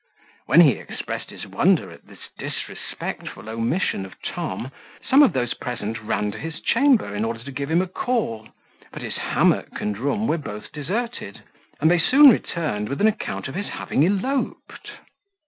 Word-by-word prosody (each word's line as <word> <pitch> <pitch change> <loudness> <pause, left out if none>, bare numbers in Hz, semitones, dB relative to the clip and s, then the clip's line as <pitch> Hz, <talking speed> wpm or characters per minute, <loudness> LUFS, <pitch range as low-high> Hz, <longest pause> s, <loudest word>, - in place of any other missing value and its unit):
When 170 - +7
he 150 -5 +7
expressed - - -6
his - - -9
wonder - - +2
at - - -15
this - - -14
disrespectful - - -6
omission 115 - -1
of 95 - -11
Tom, 130 - -4 0.4
some 270 +3 +7
of 270 -11 +6
those 120 -2 0
present 115 -2 -5
ran 105 -1 -1
to 110 - -8
his 160 -1 -6
chamber, 250 - +3
in 105 +1 -1
order 115 0 -3
to 140 - -8
give 140 +1 -4
him 170 +3 +3
a - - -5
call; 180 - -2 0.4
but - - -8
his - - -4
hammock - - +1
and 105 0 -2
room 145 - 0
were 170 - +1
both 105 -7 -8
deserted, 180 - -4 0.4
and 160 +3 +4
they 175 - +4
soon 275 - +8
returned 150 - -2
with 140 - -3
an 210 - +5
account 220 -8 -2
of 135 - -7
his 200 +5 -3
having 140 - 0
eloped. 205 - -1
150 Hz, 175 wpm, -23 LUFS, -, 0.4 s, soon